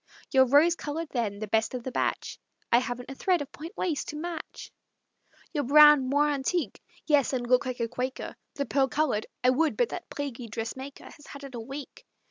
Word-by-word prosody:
"Your 265 -1 +5
rose 295 +6 +5
colored, 315 +1 -5
then, 220 -5 -1
the 215 +1 -5
best 220 +4 +1
of 245 - -5
the 260 - -4
batch" - - -2 0.3
"I 235 - +6
haven't 245 +1 -5
a - - -5
thread 360 +6 +1
of 285 - -15
point 325 +6 -9
lace 320 -6 -1
to - - -6
match." 330 +1 -6 0.8
"Your 295 -3 0
brown 295 -1 +7
moire 295 +2 +3
antique" 285 - -2 0.2
"Yes, 290 -3 +3
and 245 -2 -1
look 250 +1 +3
like 255 -1 -4
a 230 - 0
Quaker." 255 +3 -4 0.2
"The 280 - -1
pearl 275 -1 +2
colored" 265 -7 0 0.2
"I 250 - +5
would, 310 +4 +1
but 485 -2 +2
that - - -7
plaguy 265 -4 -5
dressmaker 230 +5 -6
Has 295 - -14
had 280 0 -10
it 275 -1 -9
a 240 - -5
week." 270 +5 -8
270 Hz, 205 wpm, -28 LUFS, 245-295 Hz, 0.8 s, brown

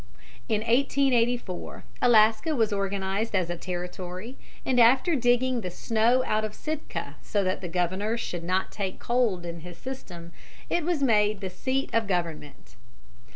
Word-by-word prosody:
In 215 - +1
1884 240 -4 +1 0.2
Alaska 225 +6 +4
was 225 -4 +2
organized 195 +2 -1
as 175 -3 +1
a - - -2
Territory, 180 +5 -6 0.3
and 255 -2 +2
after 260 +8 +5
digging 245 -1 +2
the 185 - -4
snow 230 +7 +2
out 215 0 +1
of 215 -1 -4
Sitka, 310 0 -5
so 205 -1 0
that 185 0 -1
the 180 - -5
governor 185 +6 0
should 175 -6 -4
not 185 +2 0
take 195 -3 -3
cold 235 -8 0
in 170 0 -5
his 175 +1 -10
system, 175 -9 -8 0.4
it 345 - +1
was 325 -3 0
made 210 -4 +3
the 190 -2 -5
seat 260 +8 -2
of 230 -2 +2
government. 165 -6 -4
215 Hz, 155 wpm, -27 LUFS, 180-245 Hz, 0.4 s, after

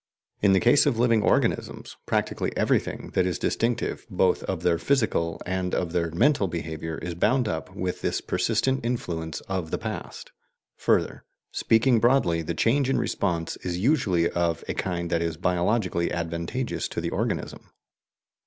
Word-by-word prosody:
In 100 -2 +5
the 95 - +5
case 120 +7 +5
of 115 - +1
living 115 -2 +3
organisms, - - 0
practically - - -1
everything - - 0
that 90 -1 +2
is 90 - -1
distinctive 115 0 -1
both 95 -2 +2
of 90 -3 -3
their 85 -2 +2
physical 110 - +1
and 90 0 -1
of 85 -2 -1
their 85 -1 0
mental 100 - +2
behaviour 80 -1 -4
is 85 +1 -5
bound 115 +8 +2
up 80 -6 -4
with 90 -1 -3
this - - 0
persistent 135 -1 0
influence 85 -9 -3
of 95 -4 -4
the - - -1
past. - - -6 0.5
Further, - - +1 0.3
speaking 115 +1 +3
broadly, 120 -9 +3
the 80 +1 -3
change 130 - +2
in 135 - +2
response 85 -1 -1
is 90 -1 -4
usually 95 - +2
of 85 -2 0
a - - -1
kind 85 -2 -3
that 85 -1 +1
is 85 -2 -2
biologically 90 +1 0
advantageous 85 +8 -3
to - - -4
the - - -3
organism. - - -3
90 Hz, 160 wpm, -26 LUFS, 85-115 Hz, 0.5 s, In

